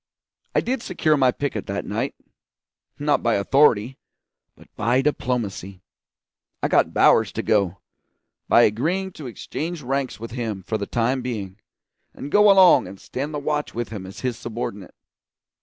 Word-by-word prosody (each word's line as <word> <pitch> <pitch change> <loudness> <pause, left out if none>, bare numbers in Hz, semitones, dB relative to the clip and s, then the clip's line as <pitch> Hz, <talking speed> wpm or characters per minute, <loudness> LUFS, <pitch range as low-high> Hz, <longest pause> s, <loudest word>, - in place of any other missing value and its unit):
I - - +4
did 255 0 -2
secure 160 -7 +1
my 130 -3 +4
picket 140 +2 -4
that - - -3
night - - -3 0.8
not 145 0 +1
by 120 - +2
authority, 125 +2 +3 0.6
but - - -18
by 120 +5 +1
diplomacy. 105 -9 -2 0.8
I - - +1
got - - +3
Bowers - - +4
to - - -3
go, 100 -4 +1 0.7
by 120 - +6
agreeing 170 - 0
to 150 -6 -9
exchange 155 +7 -5
ranks 135 -1 -2
with 115 +1 -7
him 110 -5 -4
for 110 +3 -3
the 100 - -4
time 125 +3 0
being, 105 -6 -5 0.6
and 145 - -7
go 210 0 +6
along 190 - +6
and 95 +1 -11
stand 140 +4 -5
the 150 - -3
watch 150 0 -2
with 120 0 -3
him 100 -4 -7
as 95 - -10
his 125 -3 -2
subordinate. 110 -5 -6
125 Hz, 155 wpm, -23 LUFS, 105-145 Hz, 0.8 s, by